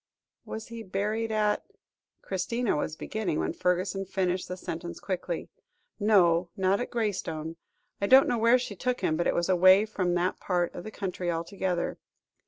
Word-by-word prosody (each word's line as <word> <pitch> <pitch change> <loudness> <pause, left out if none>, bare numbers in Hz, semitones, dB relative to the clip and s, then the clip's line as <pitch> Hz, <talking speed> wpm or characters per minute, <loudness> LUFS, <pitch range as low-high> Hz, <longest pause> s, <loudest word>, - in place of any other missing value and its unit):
"Was 220 +1 -7
he 230 0 -7
buried 215 +3 -2
at 210 -1 +1 0.3
" - - -56
Christina 220 +5 -1
was 155 +1 -2
beginning, 190 -3 -2
when - - -1
Fergusson 180 +2 0
finished 185 -1 -1
the 180 - -5
sentence 170 -1 -6
quickly. 180 -3 -3 0.5
"No, 180 -5 +4
not 190 +1 +2
at 245 - -3
Graystone. 165 -8 -2 0.4
I 200 - +2
don't 265 +3 +7
know 240 -2 +1
where 230 +2 +6
she 245 -5 -5
took 250 +5 -2
him, 155 - +1
but 175 - 0
it - - +1
was 170 - +1
away 185 +2 +6
from 185 -5 -1
that 175 +1 0
part 175 -2 0
of 175 - -7
the - - -5
country 185 -4 -4
altogether. 175 +1 -2
190 Hz, 175 wpm, -28 LUFS, 175-215 Hz, 0.5 s, don't